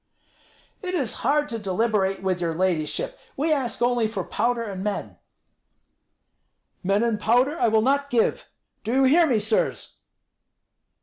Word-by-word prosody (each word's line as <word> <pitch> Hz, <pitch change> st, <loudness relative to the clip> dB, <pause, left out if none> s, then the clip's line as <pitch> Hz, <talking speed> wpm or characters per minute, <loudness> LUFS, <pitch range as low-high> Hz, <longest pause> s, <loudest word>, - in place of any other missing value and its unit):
"It 365 Hz, -2 st, -3 dB
is 270 Hz, -10 st, -1 dB
hard 295 Hz, +4 st, +2 dB
to 230 Hz, -, -3 dB
deliberate 195 Hz, -1 st, 0 dB
with 185 Hz, -2 st, -1 dB
your 165 Hz, -2 st, -1 dB
ladyship. 170 Hz, -4 st, -1 dB, 0.2 s
We 310 Hz, +3 st, +2 dB
ask 250 Hz, -5 st, -2 dB
only 240 Hz, -2 st, +2 dB
for 205 Hz, -4 st, -4 dB
powder 235 Hz, +4 st, -1 dB
and 195 Hz, -4 st, -5 dB
men." 210 Hz, 0 st, -4 dB, 1.6 s
"Men 200 Hz, +3 st, +1 dB
and 230 Hz, -3 st, 0 dB
powder 250 Hz, +9 st, +2 dB
I -, -, +3 dB
will 220 Hz, 0 st, +3 dB
not 280 Hz, +2 st, +1 dB
give. 235 Hz, -3 st, 0 dB, 0.3 s
Do 225 Hz, +2 st, -2 dB
you 270 Hz, +1 st, +4 dB
hear 320 Hz, +6 st, +5 dB
me, 250 Hz, -6 st, +2 dB
sirs!" 215 Hz, +1 st, -1 dB
230 Hz, 145 wpm, -24 LUFS, 200-265 Hz, 1.6 s, hear